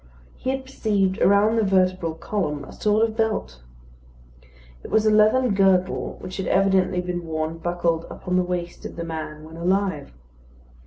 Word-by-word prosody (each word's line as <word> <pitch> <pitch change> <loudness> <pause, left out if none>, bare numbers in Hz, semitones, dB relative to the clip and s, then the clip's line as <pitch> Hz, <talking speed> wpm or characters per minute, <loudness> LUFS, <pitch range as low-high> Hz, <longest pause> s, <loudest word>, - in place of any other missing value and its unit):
He 255 - -4
had 265 0 -2
perceived 205 -7 0
around 205 +3 +4
the 225 - +3
vertebral 185 -4 +1
column 165 -4 -3
a - - -12
sort 215 +2 +2
of 220 - -8
belt. 220 - -1 1.2
It - - -8
was 220 0 +2
a 215 - +4
leathern 215 +3 +4
girdle, 190 -2 +1
which 185 0 -7
had 190 - -3
evidently 190 -1 +2
been 175 -1 -4
worn 160 +1 -3
buckled 170 -1 -1
upon 180 -1 -4
the 185 - +4
waist 175 -1 -4
of - - -7
the 170 - -4
man 155 -2 -6
when 160 +1 -11
alive. 185 - -1
185 Hz, 165 wpm, -23 LUFS, 170-210 Hz, 1.2 s, around